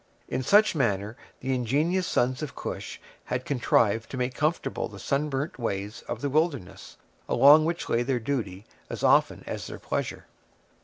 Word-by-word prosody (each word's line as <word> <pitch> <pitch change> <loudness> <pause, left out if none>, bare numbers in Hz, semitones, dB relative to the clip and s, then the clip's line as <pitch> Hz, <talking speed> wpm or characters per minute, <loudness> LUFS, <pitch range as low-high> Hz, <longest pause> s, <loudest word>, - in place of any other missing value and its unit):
In 130 - -2
such 205 - +5
manner 110 - 0 0.3
the 130 +1 -1
ingenious 150 +10 +1
sons 125 +3 +1
of 150 -2 -5
Cush - - -6 0.3
had 125 0 -3
contrived 115 -4 +2
to 130 - -6
make 125 0 -1
comfortable 150 0 -1
the 105 - -12
sunburnt 140 +2 -2
ways 105 -2 -3
of 120 -1 -4
the 145 - -1
wilderness, 150 - -2 0.3
along 150 +3 +7
which 170 +1 -2
lay 115 - +1
their 125 0 0
duty 110 -6 -3 0.2
as - - -6
often - - +3
as - - -5
their - - -7
pleasure. - - -4
130 Hz, 160 wpm, -27 LUFS, 115-150 Hz, 0.3 s, along